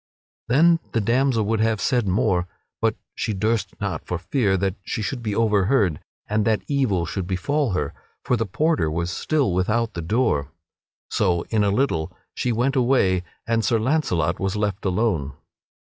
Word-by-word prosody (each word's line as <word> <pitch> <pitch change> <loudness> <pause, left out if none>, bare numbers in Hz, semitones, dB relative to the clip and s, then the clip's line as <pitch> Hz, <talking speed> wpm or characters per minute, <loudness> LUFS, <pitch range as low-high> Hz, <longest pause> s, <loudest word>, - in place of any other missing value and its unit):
Then 165 +7 +5
the 115 - +2
damsel 115 +1 +2
would 110 +1 0
have 110 -1 +1
said 120 -4 +1
more, 95 -3 +1 0.3
but - - +2 0.2
she 110 - -2
durst 105 0 -1
not 100 -2 -3
for 90 - -3
fear 95 - +1
that 95 0 0
she 110 - -3
should 125 +2 -3
be 105 -3 -2
overheard 105 - +2 0.3
and 105 0 +1
that 110 -1 +1
evil 125 -12 +1
should 95 -1 -4
befall 120 +7 0
her, 75 -5 -1 0.3
for 125 - +1
the 115 -2 -1
porter 155 - +1
was 85 +2 -2
still 140 - 0
without 105 +6 0
the 85 - -4
door. 85 - +1 0.6
So 85 -2 +1
in 110 -2 +3
a 100 - +2
little 100 - 0 0.2
she 125 - -1
went 125 +4 +1
away 120 -8 +3 0.2
and 115 -1 +1
Sir 115 - +2
Launcelot 110 - 0
was 95 +1 -1
left 105 -2 -2
alone. 90 -8 0
105 Hz, 170 wpm, -23 LUFS, 95-120 Hz, 0.6 s, Then